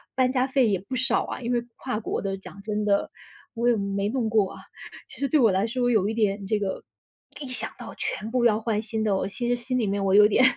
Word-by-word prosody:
搬 255 Hz, -1 st, +3 dB
家 255 Hz, 0 st, +2 dB
费 265 Hz, -3 st, +2 dB
也 195 Hz, -3 st, +2 dB
不 255 Hz, +7 st, -6 dB
少 255 Hz, -, +2 dB
啊， -, -, -5 dB
因 245 Hz, 0 st, -2 dB
为 240 Hz, 0 st, 0 dB
跨 250 Hz, -4 st, -3 dB
国 -, -, -3 dB
的 195 Hz, -1 st, -2 dB
讲 195 Hz, +1 st, -12 dB
真 210 Hz, 0 st, -2 dB
的， 200 Hz, -1 st, +1 dB, 0.4 s
我 235 Hz, +1 st, +1 dB
也 240 Hz, -, +4 dB
没 200 Hz, 0 st, -1 dB
弄 235 Hz, -3 st, -1 dB
过 215 Hz, -3 st, +2 dB
啊。 -, -, -11 dB, 0.5 s
其 -, -, -10 dB
实 275 Hz, -, +1 dB
对 305 Hz, -, +4 dB
我 230 Hz, -4 st, +6 dB
来 190 Hz, +3 st, +1 dB
说 245 Hz, +1 st, 0 dB
有 210 Hz, -3 st, +2 dB
一 -, -, -2 dB
点 205 Hz, -3 st, 0 dB
这 210 Hz, +1 st, 0 dB
个 195 Hz, -2 st, -3 dB, 0.6 s
一 285 Hz, -, -5 dB
想 225 Hz, -3 st, -3 dB
到 245 Hz, -, -8 dB
全 215 Hz, +3 st, -3 dB
部 250 Hz, 0 st, +1 dB
要 220 Hz, -2 st, +4 dB
换 220 Hz, -2 st, -1 dB
新 220 Hz, 0 st, -3 dB
的， 210 Hz, -3 st, +2 dB
我 -, -, -1 dB
其 240 Hz, +5 st, -3 dB
实 245 Hz, -, +2 dB
心 250 Hz, +1 st, -2 dB
里 215 Hz, -, 0 dB
面 200 Hz, 0 st, -1 dB
我 190 Hz, 0 st, +2 dB
有 210 Hz, +1 st, +8 dB
点 235 Hz, +4 st, +3 dB
220 Hz, 285 characters per minute, -25 LUFS, 200-245 Hz, 0.6 s, 有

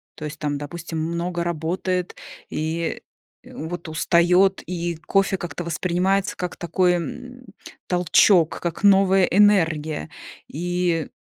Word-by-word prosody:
То -, -, -10 dB
есть 150 Hz, 0 st, -7 dB
там, 145 Hz, -1 st, -2 dB
допустим, 160 Hz, +2 st, -6 dB
много 170 Hz, +2 st, -2 dB
работает 175 Hz, +2 st, -2 dB, 0.3 s
и, 160 Hz, +2 st, -3 dB, 0.4 s
э, -, -, -14 dB
вот 170 Hz, +2 st, -6 dB
устает, 180 Hz, +4 st, +3 dB
и 175 Hz, -1 st, -3 dB
кофе 195 Hz, -1 st, +2 dB
как-то 175 Hz, -1 st, -6 dB
воспринимается 185 Hz, +4 st, 0 dB
как 180 Hz, -1 st, -4 dB
такой, 180 Hz, +1 st, +1 dB
м, 250 Hz, +9 st, -6 dB, 0.4 s
толчок, 180 Hz, -1 st, +3 dB
как 170 Hz, +2 st, -4 dB
новая 195 Hz, -1 st, +5 dB
энергия. 165 Hz, -, +2 dB, 0.4 s
И, 175 Hz, 0 st, -1 dB
175 Hz, 115 wpm, -22 LUFS, 160-185 Hz, 0.4 s, новая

